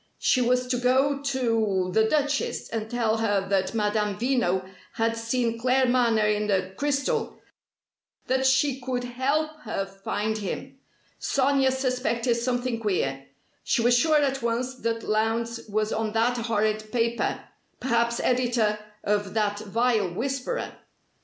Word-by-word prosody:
She 255 - +2
was 250 +1 +2
to 250 0 -1
go 270 +3 +2
to 225 -9 0
the 220 - +4
Duchess, 290 +3 0
and 220 -1 -4
tell 225 -2 +1
her 205 -3 0
that 195 +2 0
Madame 210 -1 0
Veno 220 -7 0 0.3
had 230 0 0
seen 230 0 -1
Claremanagh 245 -4 +3
in 210 0 -2
the 190 -2 0
crystal 280 -1 -1 0.9
that 260 +1 +2
she 265 0 +2
could 250 0 -2
help 270 +6 0
her 220 -7 -3
find 205 +3 -3
him. 265 +7 -5 0.4
Sonia 275 0 +2
suspected 255 -2 0
something 245 0 -1
queer. 135 -11 -1 0.4
She 230 - +1
was 240 +1 +5
sure 310 +5 +4
at 270 -2 +1
once 235 +2 -1
that 230 0 -2
Lowndes 230 +2 -1
was 215 +1 0
on 220 -1 -2
that 230 +2 +2
horrid 215 -2 -1
paper 235 0 0 0.4
perhaps 235 -2 +1
editor 240 -4 +1 0.2
of 205 -1 -1
that 205 -1 +1
vile 215 -2 +1
'Whisperer'. 270 - -3
235 Hz, 135 wpm, -26 LUFS, 215-255 Hz, 0.9 s, was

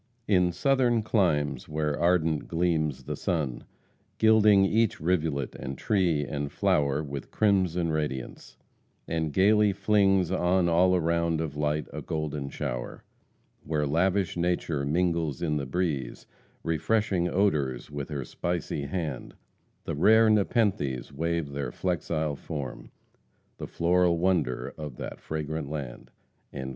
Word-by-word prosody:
"In 90 -3 +3
Southern 120 +3 +2
climes 75 - 0
where 75 -1 -1
ardent 80 -3 +1
gleams 80 -4 0
the - - -4
sun, 75 -8 -2 0.5
Gilding 105 -3 +5
each 110 +2 +1
rivulet, 80 -6 0
and 65 0 -6
tree, 85 -7 +1
and 70 0 -4
flower, 70 +1 +1
With 70 -2 -6
crimson 90 -5 +1
radiance 75 -5 -4 0.5
and 80 -2 -1
gaily 105 +3 +4
flings 95 -3 +2
On 90 -1 +2
all 90 +2 +4
around 85 -1 +1
of 80 -3 -3
light 75 0 -1
a - - -5
golden 75 -3 -3
shower - - -5 0.6
Where 75 -1 -1
lavish 90 +5 +1
nature 85 -5 -1
mingles 85 -2 0
in 75 -3 0
the 70 -2 -3
breeze, 70 -6 -2 0.4
Refreshing 90 +2 0
odors 75 -10 0
with 70 0 -5
her 70 -4 -4
spicy 85 -5 -3
hand; 75 -5 -4 0.5
The - - -4
rare 110 +8 +5
Nepenthes 95 - 0
wave 80 0 -2
their 70 0 -3
flexile 80 -4 -2
form, 70 -1 -6 0.7
The - - -5
floral 85 0 +2
wonder 85 -8 0
of 75 -5 -7
that - - -7
fragrant 80 -1 -4
land." 65 -5 -6
80 Hz, 125 wpm, -27 LUFS, 75-90 Hz, 0.7 s, Gilding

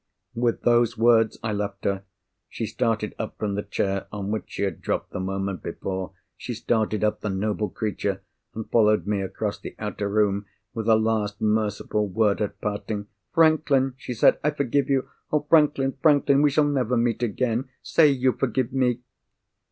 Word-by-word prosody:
With 120 0 0
those 120 -1 +3
words, 115 -1 +4
I 110 -2 -1
left 100 -1 -4
her. 100 -1 -1 0.4
She 115 - -4
started 115 -2 -1
up 110 - -5
from 105 -2 -2
the 100 - -1
chair 100 -1 -2
on 100 -1 -4
which 110 - -2
she - - -4
had 95 -5 -2
dropped - - -2
the - - -4
moment 95 -1 -3
before: 95 -1 -5 0.2
she 120 - -6
started 110 -1 0
up—the 105 0 0
noble 105 +1 -1
creature!—and 100 +2 -5
followed 105 -2 +4
me 105 -1 0
across 100 +2 -3
the - - -9
outer 105 -1 -3
room, 100 -1 +1 0.3
with 115 0 -2
a 110 - +7
last 110 -2 0
merciful 105 -1 0
word 100 0 +1
at 105 - -3
parting. 105 0 -3 0.3
"Franklin!" 155 -5 +3
she 125 -2 -6
said, 115 - +4
"I 150 - +3
forgive 140 -2 0
you! 135 -1 +1 0.2
Oh, 150 -1 +1
Franklin, 145 -4 +3
Franklin! 145 -2 +4
we 150 - +5
shall 150 +2 +3
never 130 -4 +1
meet 115 0 +1
again. 120 +2 -1
Say 160 - +5
you 130 -2 +2
forgive 125 -1 -1
_me! 125 -2 +1
110 Hz, 170 wpm, -25 LUFS, 105-125 Hz, 0.4 s, a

